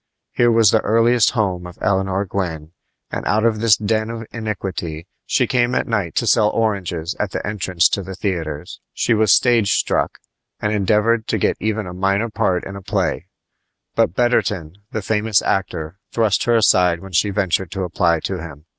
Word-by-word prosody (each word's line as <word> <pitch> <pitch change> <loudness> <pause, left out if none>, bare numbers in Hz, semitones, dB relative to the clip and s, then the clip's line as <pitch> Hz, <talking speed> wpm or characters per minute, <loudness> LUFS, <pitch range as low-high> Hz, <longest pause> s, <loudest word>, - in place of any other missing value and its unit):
Here 120 - +3
was 115 -3 +5
the - - +3
earliest 115 +1 +3
home 90 -5 -1
of 90 - -12
Eleanor 95 0 0
Gwyn, 80 -5 -4 0.4
and - - -4
out 110 +2 +2
of 110 -2 +2
this 110 -2 +4
den 110 +1 -1
of 115 -1 -6
iniquity 95 -7 -4 0.2
she - - +2
came 125 0 +1
at - - +1
night 100 -8 -2
to - - +1
sell 105 -1 +4
oranges 95 -7 -2
at 105 - -1
the - - -4
entrance 95 -4 +1
to 100 - -1
the 95 0 -7
theaters. 80 -7 -4
She 120 - +1
was 110 -3 +3
stage 115 -3 +4
struck, - - 0 0.4
and 105 0 -1
endeavored 105 +3 +1
to - - 0
get - - 0
even 110 0 -2
a 90 - -7
minor 100 +4 0
part 90 -3 0
in 100 - -7
a 100 - -8
play; 95 -5 -2 0.7
but 85 - +1
Betterton, 100 -9 0
the 110 - -4
famous 110 -1 +2
actor, 90 -2 -2
thrust 110 -3 +1
her 120 -1 +3
aside 90 -6 +3
when 95 - -10
she 95 +4 +2
ventured 95 -3 0
to 95 +3 -4
apply 85 -2 +1
to 95 -2 -3
him. 75 -2 -10
100 Hz, 185 wpm, -20 LUFS, 90-110 Hz, 0.7 s, was